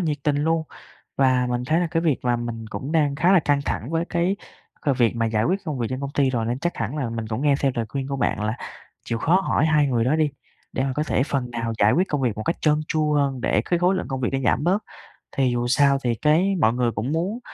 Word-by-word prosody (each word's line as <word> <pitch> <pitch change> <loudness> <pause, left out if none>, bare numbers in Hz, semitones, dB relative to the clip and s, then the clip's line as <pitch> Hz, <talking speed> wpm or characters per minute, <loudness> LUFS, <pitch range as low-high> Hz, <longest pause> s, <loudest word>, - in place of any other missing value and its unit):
nhiệt 155 -4 0
tình 145 -1 +1
luôn. 160 +2 +1 0.5
Và 130 -2 +3
mình 125 0 -1
thấy 160 +4 +2
là 175 - +1
cái 165 - 0
việc 155 -6 +2
mà 120 -1 +1
mình 115 -1 -5
cũng 140 +5 -5
đang 150 -3 +2
khá 170 +6 +3
là 190 - +6
căng 145 -1 +1
thẳng 120 - -3
với 165 +1 0
cái, 175 +3 0 0.4
ờ, 145 - +1
việc 120 -2 +2
mà 115 -1 +1
giải 110 -1 0
quyết 190 +7 +1
công 150 -6 -3
việc 120 - -1
trên 130 +1 -3
công 140 0 -4
ty 135 -2 +2
rồi. 115 -3 -1
Nên 120 +2 -1
chắc 175 +5 -2
hẳn 115 +5 -3
là 130 -6 -2
mình 115 -1 -4
cũng 115 +5 -3
nghe 145 -2 +4
theo 135 -2 +2
lời 115 -2 -2
khuyên 135 +2 -4
của 140 - -2
bạn 125 - 0
là 110 +2 -1 0.5
chịu 115 - -2
khó 180 +10 +3
hỏi 160 -5 +1
hai 150 -2 +3
người 120 -4 +1
đó 140 +5 +2
đi, 155 -2 +2 0.4
để - - -1
mà 135 - -1
có 150 - +1
thể 155 - +1
phần 135 -3 -2
nào 115 -1 -3
giải 105 +1 +4
quyết 185 +4 +2
công 145 - -1
việc 120 -5 0
một 110 - -4
cách 165 - 0
trơn 150 -1 +2
tru 155 -1 +1
hơn, 140 -3 +1
để 105 - +1
cái 175 - 0
khối 180 +2 +3
lượng 185 - -3
công 135 -2 -3
việc 120 - 0
nó 135 - +1
giảm 135 - +2
bớt. 190 +5 +2 0.5
Thì 130 -2 +1
dù 120 0 -1
sao 140 +2 +4
thì 120 -2 +1
cái 165 - +2
mọi 115 -6 +3
người 120 -1 +1
cũng 115 +6 -3
muốn 180 +8 -1
140 Hz, 285 wpm, -23 LUFS, 120-155 Hz, 0.5 s, là